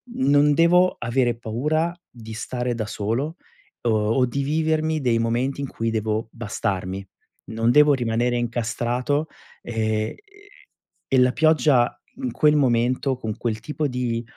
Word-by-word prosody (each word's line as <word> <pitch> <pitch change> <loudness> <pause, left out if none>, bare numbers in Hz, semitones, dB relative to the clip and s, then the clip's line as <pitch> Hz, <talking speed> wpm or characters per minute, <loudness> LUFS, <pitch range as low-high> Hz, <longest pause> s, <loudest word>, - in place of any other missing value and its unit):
"Non 145 +2 +4
devo 180 +3 +4
avere 120 -1 0
paura 150 +9 -1 0.2
di 110 -2 -10
stare 120 +1 -3
da 110 -2 -3
solo, 120 +12 -2 0.5
o 120 - +2 0.2
o 130 0 +3
di 140 +3 -2
vivermi 155 +1 0
dei 120 -3 +2
momenti 120 +4 -1
in 140 - -3
cui 115 -2 -3
devo 110 0 -2
bastarmi. 100 -4 -3 0.5
Non 115 +1 +1
devo 150 +1 +6
rimanere 120 -1 0
incastrato." 120 +5 -1 0.3
E 115 -2 -4 0.3
ehm, - - -10 1.0
e 130 - +5
la 125 0 +5
pioggia 150 -5 +3 0.3
in 255 - -2
quel 150 0 +3
momento, 125 0 +1
con 110 -4 -4
quel 110 -3 -2
tipo 150 +3 -2
di, 120 -2 -2
125 Hz, 140 wpm, -23 LUFS, 115-145 Hz, 1.0 s, devo